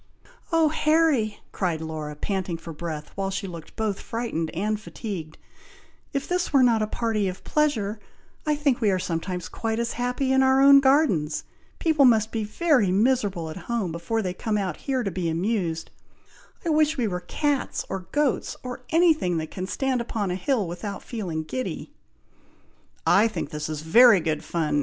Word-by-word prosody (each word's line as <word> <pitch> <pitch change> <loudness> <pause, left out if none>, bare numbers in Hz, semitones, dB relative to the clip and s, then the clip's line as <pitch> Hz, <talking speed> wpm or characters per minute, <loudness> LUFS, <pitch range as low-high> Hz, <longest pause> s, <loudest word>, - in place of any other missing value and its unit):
"Oh, 325 -2 +4
Harry!" 305 -8 +2
cried 175 -5 -1
Laura, 155 -2 -5
panting 185 +1 -2
for 165 0 -9
breath, 155 -1 -6
while 195 0 -2
she 195 +1 -3
looked 170 -4 -9
both 215 -3 -1
frightened 225 -9 -3
and 210 +6 -1
fatigued, 190 -8 -7 0.7
"If 275 -1 -2
this 360 0 -1
were 275 -3 +5
not 230 -3 +4
a 215 - 0
party 220 -2 -1
of 185 0 -5
pleasure, 230 -9 0 0.4
I 300 -1 +1
think 285 -4 +1
we 215 - +3
are 190 - +2
sometimes 180 0 -3
quite 225 -1 -3
as 235 0 -1
happy 250 +2 -1
in 265 - +4
our 265 0 +4
own 275 0 +8
gardens! 265 - +2 0.3
People 315 -4 +3
must 220 -3 +4
be 225 -1 -2
very 245 - +2
miserable 200 -6 +1
at 155 - -8
home, 225 -7 -1
before 195 +7 -2
they 180 -1 -2
come 215 +4 -2 0.2
here 260 - -2
to 195 - -2
be 175 -1 -2
amused! 170 -1 -1 0.7
I - - 0
wish 310 0 +3
we 240 -4 +1
were 180 -3 -2
cats, 285 +9 -1
or 190 -2 -5
goats, 290 -3 0
or 250 0 -6
any 330 +1 +5
thing 180 - -1
that 160 -1 -4
can 185 0 -5
stand 260 +2 0
upon 215 -5 -2
a - - -1
hill 210 +1 0
without 190 +4 -6
feeling 180 -9 -4
giddy." 255 +11 -5 1.1
"I 210 +3 +5
think 220 - -5
this 150 0 -4
is 155 -1 -4
very 225 +6 +7
good 155 -2 -2
fun!" 155 -3 0
215 Hz, 180 wpm, -25 LUFS, 175-260 Hz, 1.1 s, own